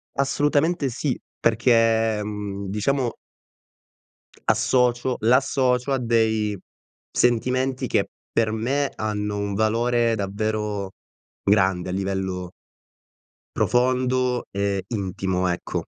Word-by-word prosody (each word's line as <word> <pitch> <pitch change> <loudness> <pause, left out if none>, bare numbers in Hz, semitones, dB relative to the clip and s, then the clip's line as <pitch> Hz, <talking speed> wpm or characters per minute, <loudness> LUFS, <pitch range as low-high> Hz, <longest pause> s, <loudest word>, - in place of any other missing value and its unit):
Assolutamente 145 +2 +1
sì, 130 +2 -2 0.2
perché, 115 -1 +3
ehm, 105 -1 -4
diciamo 120 +5 0 1.3
associo 125 0 +2
l'associo 125 +2 +2
a - - +2
dei 110 -3 +1 0.5
sentimenti 130 +2 +1
che - - +1 0.2
per 110 -2 +1
me 135 +6 0
hanno 105 -1 -2
un 100 0 -2
valore 115 +2 +2
davvero 105 -1 -2 0.5
grande 95 -3 +2
a - - -2
livello 95 -1 -3 1.1
profondo 125 0 +1
e 100 -1 -1
intimo, 95 -3 -1
ecco. 90 -1 -2
110 Hz, 90 wpm, -23 LUFS, 100-125 Hz, 1.3 s, perché